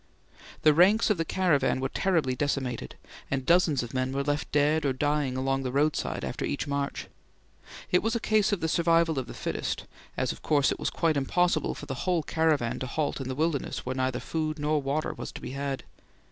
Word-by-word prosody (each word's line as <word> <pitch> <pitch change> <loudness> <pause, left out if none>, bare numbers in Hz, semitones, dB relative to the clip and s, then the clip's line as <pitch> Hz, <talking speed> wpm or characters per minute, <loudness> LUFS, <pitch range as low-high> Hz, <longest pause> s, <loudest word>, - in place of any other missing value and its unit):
The 155 - +7
ranks 200 +8 +5
of 195 - 0
the 165 - 0
caravan 170 -7 +2
were 135 - 0
terribly 155 -5 +1
decimated, 130 -3 -2 0.3
and 135 -1 -2
dozens 170 -6 +3
of 120 - -8
men 130 0 -1
were 140 +1 0
left 145 +1 -2
dead 150 +2 +3
or 140 -2 +1
dying 145 -1 0
along 135 +1 0
the 130 -1 -3
roadside 145 +3 0
after - - -4
each - - -2
march. 140 -1 -2 0.9
It 180 - +4
was 225 +1 0
a - - +1
case 215 -2 +2
of 200 -4 -1
the 160 - +1
survival 165 -2 +3
of 125 - -5
the - - -8
fittest, - - -3 0.3
as - - 0
of - - -9
course 145 -3 +2
it - - -3
was - - 0
quite 160 -3 +1
impossible 155 +3 +1
for - - -8
the - - -4 0.2
whole 175 -3 +2
caravan 155 -8 +1
to 130 - -3
halt 145 +1 -2
in 130 - -4
the 130 - -3
wilderness 155 -1 -1
where 130 - -2
neither 130 -1 -1
food 155 -1 -2
nor 150 0 +1
water 140 +3 -1
was - - -7
to - - -7
be - - -7
had. 140 0 -3
145 Hz, 215 wpm, -28 LUFS, 135-165 Hz, 0.9 s, The